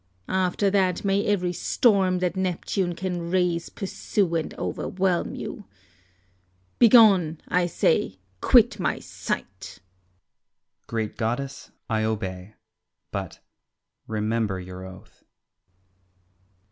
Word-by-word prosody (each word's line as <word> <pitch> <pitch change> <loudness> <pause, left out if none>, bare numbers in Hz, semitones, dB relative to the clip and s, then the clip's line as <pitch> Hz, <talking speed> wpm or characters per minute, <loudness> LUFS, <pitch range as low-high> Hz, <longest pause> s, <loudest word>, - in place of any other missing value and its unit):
After 190 +1 +1
that 190 -2 +1
may 200 +1 +2
every 180 -4 +1
storm 190 0 +2
that 180 -1 0
Neptune 185 -1 -1
can 175 -1 -3
raise 175 -2 0
pursue 195 -2 -2
and 165 -2 -1
overwhelm 185 -2 -1
you. 205 - -7 1.1
Begone, 200 -9 +6
I 180 -1 +2
say, 130 - +1 0.2
quit 235 -3 +5
my - - 0
sight. - - -4 0.3
Ulysses. 90 0 -40
Great 110 -2 -3
goddess, 125 +5 -3 0.2
I 110 -1 0
obey, 100 -2 -3 0.6
but - - -5 0.7
remember 110 -2 -1
your 90 0 -8
oath. 95 0 -13
175 Hz, 100 wpm, -25 LUFS, -, 1.1 s, Begone